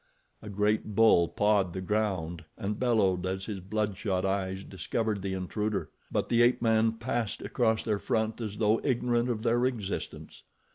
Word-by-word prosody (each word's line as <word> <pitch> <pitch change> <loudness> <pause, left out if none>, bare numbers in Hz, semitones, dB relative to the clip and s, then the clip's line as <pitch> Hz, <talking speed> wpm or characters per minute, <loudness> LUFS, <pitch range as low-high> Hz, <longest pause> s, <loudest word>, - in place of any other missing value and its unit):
A 105 - -8
great 105 +1 0
bull 110 -6 +5
pawed 100 -2 +1
the 95 - -4
ground 95 -5 -1
and 105 -1 -3
bellowed 105 -8 +2
as 95 +1 -3
his 105 -3 -5
bloodshot 100 -1 -1
eyes 95 0 -1
discovered 105 +2 -2
the 95 0 -2
intruder; 105 +3 -2 0.2
but - - 0
the 120 0 +4
ape 120 +1 +4
man 115 -1 +3
passed 115 -1 -3
across 110 -3 +1
their 105 -3 0
front 110 +3 -1
as 105 -2 -4
though 110 +1 +2
ignorant 120 -2 +1
of 110 -2 -2
their 120 +1 +2
existence. 110 -6 -5
105 Hz, 160 wpm, -29 LUFS, 95-115 Hz, 0.2 s, bull